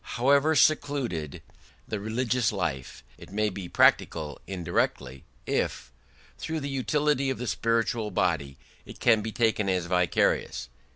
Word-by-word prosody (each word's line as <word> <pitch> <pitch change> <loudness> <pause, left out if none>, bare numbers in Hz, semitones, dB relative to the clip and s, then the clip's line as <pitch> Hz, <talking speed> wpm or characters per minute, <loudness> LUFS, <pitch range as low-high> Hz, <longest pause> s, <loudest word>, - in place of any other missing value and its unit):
However 140 +5 +4
secluded 135 - +1 0.4
the 110 - -3
religious 115 +2 0
life, 75 -10 -4 0.2
it - - -13
may 105 +1 +1
be 95 -2 -7
practical 75 -4 +2
indirectly 85 -7 -2 0.2
if 60 - -2 0.5
through 160 -1 -3
the 140 - -4
unity 140 +1 0
of 130 - -2
the 125 - -5
spiritual 115 -1 0
body 80 -8 -1 0.3
it - - -12
can 115 -3 +4
be 110 +1 -4
taken 110 -3 +1
as 90 -2 0
vicarious". 90 0 0
110 Hz, 130 wpm, -27 LUFS, 90-130 Hz, 0.5 s, However